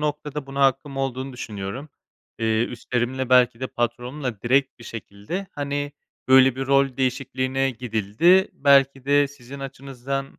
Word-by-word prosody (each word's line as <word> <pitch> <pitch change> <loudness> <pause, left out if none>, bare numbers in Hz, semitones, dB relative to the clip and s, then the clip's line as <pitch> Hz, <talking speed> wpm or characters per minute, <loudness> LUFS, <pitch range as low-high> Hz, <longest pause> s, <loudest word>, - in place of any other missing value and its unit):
noktada 150 -1 -3
buna 140 0 -4
hakkım 135 +1 0
olduğunu 135 0 -3
düşünüyorum. 110 +4 -6 0.5
Eee, 110 0 +1
üstlerimle 125 +2 -3
belki 125 -1 +4
de 130 - -2
patronumla 120 0 -3
direkt 135 +2 +1
bir 120 - -12
şekilde, 115 - -6
hani, 145 0 -3 0.4
"Böyle 130 -1 +6
bir 135 0 -3
rol 135 -2 +2
değişikliğine 135 0 0
gidildi, 125 - +2
belki 135 -1 +3
de 145 0 +3
sizin 140 0 -11
açınızdan, 135 0 -6
135 Hz, 135 wpm, -23 LUFS, 120-140 Hz, 0.5 s, Böyle